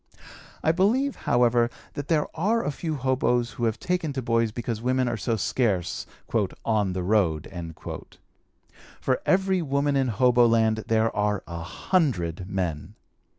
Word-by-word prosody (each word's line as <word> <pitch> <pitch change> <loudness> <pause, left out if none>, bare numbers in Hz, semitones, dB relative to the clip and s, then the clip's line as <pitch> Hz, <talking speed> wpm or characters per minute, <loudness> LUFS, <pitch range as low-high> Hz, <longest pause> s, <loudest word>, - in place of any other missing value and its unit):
I 160 - +4
believe, 230 +11 +2
however, 120 -1 +4 0.2
that 145 0 -5
there 155 -3 +2
are 215 +8 +1
a 145 - 0
few 155 +2 -3
hoboes 125 -2 +1
who 120 - -2
have 110 -1 -1
taken 180 -4 -1
to 135 - -2
boys 115 -1 +1
because 115 -1 -4
women 130 +1 +1
are 120 - 0
so 115 +1 -1
scarce 105 -3 -1 0.6
"on 105 -4 +1
the 90 -1 -2
road." 90 -6 +1 1.5
For 130 -1 0
every 190 -1 +3
woman 140 -1 0
in 135 -1 +2
hoboland 115 -2 +3
there 110 0 +2
are 105 -1 0
a 85 -1 -6
hundred 90 - -1
men. 90 -6 -3
120 Hz, 145 wpm, -26 LUFS, 105-145 Hz, 1.5 s, I